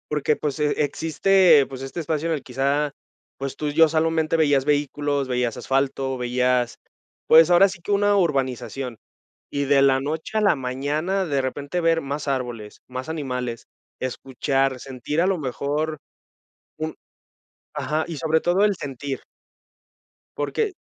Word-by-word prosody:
Porque, 150 0 +1
pues, 145 -1 -3
e 150 -1 +2
existe, 165 0 +4
pues, 135 -1 -8
este 135 +6 -5
espacio 155 +1 -2
en 165 - +1
el 150 - -3
quizá, 140 +3 0 0.5
pues, 135 0 -4
tú 150 - -2
ya 160 +2 +6
solamente 160 0 +1
veías 145 -4 +3
vehículos, 145 -1 0
veías 125 -2 0
asfalto, 135 0 -1
veías, 125 0 0 0.5
pues, 160 +1 +7
ahora 180 +3 +6
sí 190 -1 -8
que 205 - -1
una 205 0 +3
urbanización, 135 - -1 0.5
y 140 0 -1
de 140 0 +4
la 135 -1 +4
noche 155 +9 -3
a - - +2
la 200 -4 +4
mañana, 145 +8 -1
de 140 -4 0
repente, 140 +6 -3
ver 165 -1 +2
más 140 +1 -4
árboles, 120 -6 -4
más 130 +2 -6
animales, 125 -6 -4 0.3
escuchar, 135 +1 -1
sentir 135 +4 -3
a 175 - +3
lo 190 -1 +1
mejor 150 +3 -2 0.8
un 155 0 -4 0.8
ajá, 150 +2 -1
y 165 -3 -6
sobre 160 +1 +1
todo 175 +3 +2
el 205 -2 +2
sentir 140 -1 -5 1.2
porque, 435 -3 -1
145 Hz, 150 wpm, -23 LUFS, 135-160 Hz, 1.2 s, pues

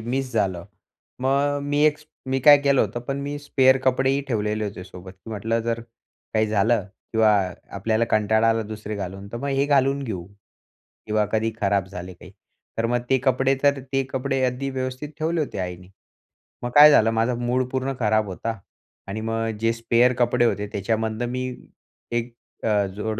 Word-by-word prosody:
Miss 130 +3 -3
झालं. 95 -6 0 0.6
मग 140 +2 +2
मी 145 +1 0
एक 155 -1 +4 0.3
मी 130 0 0
काय 145 +3 +9
केलं 140 -2 +3
होतं, 110 +3 -1
पण 135 +3 -4
मी 145 +1 -4
स्पेअर 135 -2 +3
कपडेही 130 +1 +2
ठेवलेले 105 -2 -1
होते 100 -3 -6
सोबत. 95 0 -11
की 95 +4 -13
म्हटलं 110 +2 -1
जर 115 0 -2 0.5
काही 110 0 +3
झालं 110 0 +2 0.3
किंवा 110 -1 +4 0.5
आपल्याला 110 +3 +1
कंटाळा 110 +1 +3
आला 115 0 +2
दुसरे 105 0 -6
घालून 95 0 -6
तर - - -3
मग 140 +4 -4
हे 135 0 +1
घालून 140 -1 +2
घेऊ 95 -9 -5 0.8
किंवा 105 0 +1
कधी 110 +1 +1
खराब 100 -2 +1
झाले 95 -1 -8
काही. 90 +1 -14 0.5
तर 115 - +1
मग 120 +1 +1
ते 130 - +4
कपडे 130 +1 +2
तर, 140 -1 +3
ते 135 +1 -1
कपडे 135 0 -1
अगदी 125 +2 -2
व्यवस्थित 130 +2 -4
ठेवले 160 +1 0
होते 140 - -3
आईनी. 90 0 -5 0.8
मग 120 - -2
काय 150 +1 +10
झालं 115 -5 +5
माझं 115 +2 +1
मूड 125 +1 +1
पूर्ण 130 +1 -1
खराब 110 -2 +2
होता. 115 +4 -4 0.5
आणि 100 +3 -4
मग 115 0 -2
जे 115 +1 +2
स्पेअर 120 +2 +3
कपडे 120 0 +3
होते 105 -2 0
त्याच्यामधून 110 +3 -2
मी 130 +1 -2 0.6
एक 120 0 -2 0.3
अ, 105 -2 +2
जोड 110 +1 -3
115 Hz, 175 wpm, -23 LUFS, 105-130 Hz, 0.8 s, काय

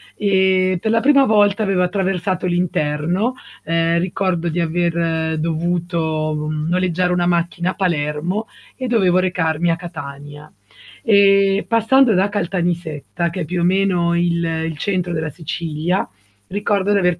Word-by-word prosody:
e 190 -2 +2
per 220 - 0
la 225 0 +2
prima 275 0 +5
volta 210 -2 +3
avevo 195 -3 +1
attraversato 185 -1 -1
l'interno, 175 +4 0 0.3
ehm, 165 +1 +1
ricordo 175 -1 -1
di 170 +2 -2
aver 165 -1 0
dovuto 160 -2 -1
noleggiare 180 +3 0
una 175 -1 +1
macchina 175 +1 0
a - - -7
Palermo 175 +3 -1 0.3
e 255 -1 -4
dovevo 190 -6 +3
recarmi 175 -3 0
a 165 - +2
Catania. 145 -3 -9 0.5
E 200 -1 +4
passando 230 +2 +4
da 195 +2 +2
Caltanissetta, 175 -4 -2
che 180 +2 -5
è 155 - -2
più 175 +2 -2
o - - 0
meno 180 -2 +2
il 170 0 +1
il 160 -1 -3
centro 180 0 -2
della 160 -1 -2
Sicilia, 165 +3 -3 0.4
ricordo 205 0 0
di 205 - +3
aver 180 -3 +1
175 Hz, 140 wpm, -19 LUFS, 165-195 Hz, 0.5 s, prima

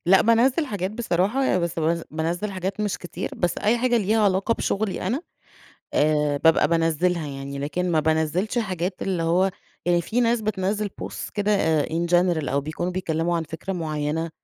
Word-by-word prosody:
لأ 190 +2 +6
بانزّل 245 +7 +3
حاجات 200 -6 -3
بصراحة، 220 +3 0
ي 185 - +2
بس 170 -1 -2
بز 165 +1 0
بانزّل 170 +6 -2
حاجات 190 +1 -4
مش 210 -2 -1
كتير، 175 - -5
بس 175 - -1
أي 220 +3 +2
حاجة 245 0 +2
ليها 215 +1 +1
علاقة 195 +3 +2
بشغلي 210 -3 -1
أنا، 250 +9 -1 0.7
آآ 150 -1 +2
بابقى 160 -2 +5
بانزّلها 165 0 +1
يعني 140 0 -6
لكن 175 +6 -2
ما 160 - +3
بانزّلش 160 +8 0
حاجات، 185 -4 -2
اللي 185 -3 -1
هو 180 +4 +2 0.4
يعني 175 -1 +3
في 235 +8 -1
ناس 235 -1 +2
بتنزّل 205 0 -1
Posts - - -6
كده 200 -7 +2
in 165 +2 -1
general، 175 -5 +2
أو 140 +2 +1
بيكونوا 160 +5 -3
بيتكلموا 170 -1 -1
عن 165 - -1
فكرة 160 +5 -6
معيّنة، 160 -1 -2
180 Hz, 175 wpm, -24 LUFS, 160-205 Hz, 0.7 s, لأ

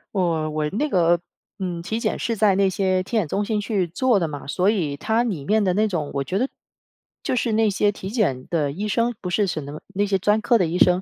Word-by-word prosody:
我， 165 -4 +1
我 150 0 -1
那 265 - -1
个， 175 - +3 0.4
嗯， 180 -3 -3
体 220 +6 -3
检 - - -1
是 230 - -1
在 205 -2 +4
那 195 0 +3
些 185 0 +1
体 220 +5 -2
检 185 -8 +1
中 205 +7 -1
心 210 0 -1
去 200 -4 -1
做 210 +5 +2
的 165 - 0
嘛， 145 -2 -7
所 180 +7 +1
以 165 -10 0
它 225 +10 +1
里 185 - -3
面 215 +6 +2
的 185 -2 +2
那 215 +2 +2
种 160 -7 -3
我 140 -1 -1
觉 185 +8 -2
得 255 +5 +1 0.8
就 - - 0
是 235 -1 0
那 220 0 +3
些 205 +1 +2
体 195 0 -7
检 155 - 0
的 150 -5 0
医 200 +8 -4
生， 230 +2 +1
不 180 -2 -4
是 200 +1 +2
什么 150 -3 -4 0.2
那 205 +1 +2
些 195 -1 +1
专 210 +3 +2
科 230 +1 +3
的 175 - +2
医 175 +3 -2
生， 180 +1 +4
190 Hz, 270 characters per minute, -23 LUFS, 170-215 Hz, 0.8 s, 在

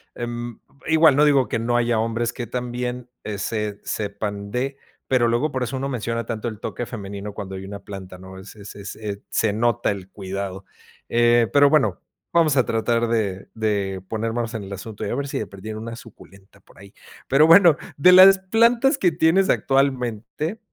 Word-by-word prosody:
em, 120 -1 -5 0.3
igual 160 -2 +5
no 150 +2 +5
digo 140 -3 +3
que - - -2
no 120 +1 0
haya 120 -1 +1
hombres 115 +1 -1
que 120 - -6
también 125 +1 -4
ese 105 0 -3
se - - -3
sepan 100 0 -5
de, 135 +3 -2 0.3
pero 125 -3 +3
luego 120 +6 0
por 130 -2 -2
eso 125 +2 -3
uno 135 +1 -3
menciona 115 -2 -3
tanto 115 0 -4
el 110 -2 -10
toque 120 - -5
femenino 100 -2 -7
cuando 95 -1 -7
hay 95 - -7
una 100 +1 -7
planta, 95 -2 -9
¿no? 95 +1 -12
Es 95 +3 -12
es 100 -1 -11
es 100 0 -6
se 110 -2 +1
nota 120 +1 +1
el 95 -2 -7
cuidado. 95 -1 -6 0.4
Eh, 120 0 +4
pero 145 0 +6
bueno, 150 -2 +2 0.3
vamos 160 -4 +3
a 130 - +4
tratar 115 +1 0
de 105 -5 -2
de 100 -4 -1
ponernos 115 +2 -3
en 110 -2 -4
el 100 - -7
asunto 100 +2 -7
y - - -3
a - - -2
ver 140 +1 -3
si - - -3
de 105 - -4
perdida 105 +2 -8
una 115 +1 -6
suculenta 100 -4 -16
por - - -23
ahí. 100 0 -15 0.4
Pero 150 +4 +5
bueno, 165 -2 +7 0.2
de 160 +6 +6
las 190 +1 +9
plantas 235 +8 +3
que 180 - +2
tienes 170 +4 +3
actualmente, 135 - 0
115 Hz, 190 wpm, -22 LUFS, 100-135 Hz, 0.4 s, las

